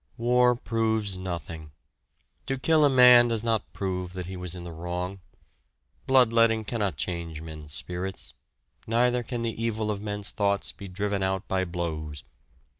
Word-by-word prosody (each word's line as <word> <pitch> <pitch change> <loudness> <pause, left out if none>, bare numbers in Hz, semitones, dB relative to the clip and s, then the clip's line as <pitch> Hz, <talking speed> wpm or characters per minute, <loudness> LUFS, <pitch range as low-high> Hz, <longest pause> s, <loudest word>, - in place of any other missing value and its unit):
War 125 +1 +4
proves 110 -3 0
nothing. 85 -4 -6 0.8
To 135 +1 -1
kill 155 +3 +3
a 145 - +6
man 125 -2 +8
does 115 -2 -1
not 115 -2 -1
prove 90 -2 -3
that 90 -1 -5
he 95 +2 -7
was 90 -1 -6
in 90 - -7
the 85 - -7
wrong. 90 +3 -4 0.9
Bloodletting 115 -4 +4
cannot 100 - -2
change 85 -1 -3
men's 75 -2 -9
spirits, 90 +4 -5 0.5
neither 120 +2 +2
can 120 0 -4
the 115 0 -3
evil 110 -2 -1
of 100 -1 -4
men's 105 -1 -4
thoughts 100 -1 0
be 100 - -10
driven 100 +2 -2
out 95 0 -1
by 95 0 0
blows. 80 -5 -4
100 Hz, 155 wpm, -27 LUFS, 90-115 Hz, 0.9 s, man